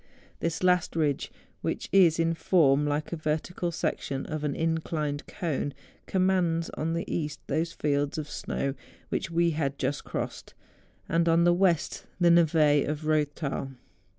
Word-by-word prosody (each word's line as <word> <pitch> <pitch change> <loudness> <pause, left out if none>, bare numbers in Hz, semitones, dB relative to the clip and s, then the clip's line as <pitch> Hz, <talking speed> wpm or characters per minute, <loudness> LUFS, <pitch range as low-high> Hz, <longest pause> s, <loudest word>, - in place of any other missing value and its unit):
This 165 +1 -2
last 180 -2 +2
ridge, 150 -4 0 0.3
which - - -2
is 180 -5 +6
in 165 0 +2
form 150 -4 +3
like 150 +3 -2
a - - +1
vertical 160 +3 -2
section 135 -4 -2
of 155 -1 -4
an 145 -2 -1
inclined 160 -3 -2
cone, 145 -4 -3 0.3
com¬ 190 - 0
mands 175 -3 +1
on 160 +2 -2
the 170 - -1
east 150 -2 -3
those 165 +1 -1
fields 145 -2 -1
of 155 -1 -3
snow 140 -1 -3 0.4
which 190 - -2
we 170 0 +2
had 140 -3 -2
just 145 - -2
crossed, - - -5 0.5
and 170 0 +2
on 165 +1 +4
the 175 0 +5
west 175 -3 +1
the 175 -1 +5
neve 170 -1 +4 0.3
of 150 0 -3
the 155 -1 +2
Eoththal. 140 -2 -4
160 Hz, 160 wpm, -28 LUFS, 150-170 Hz, 0.5 s, is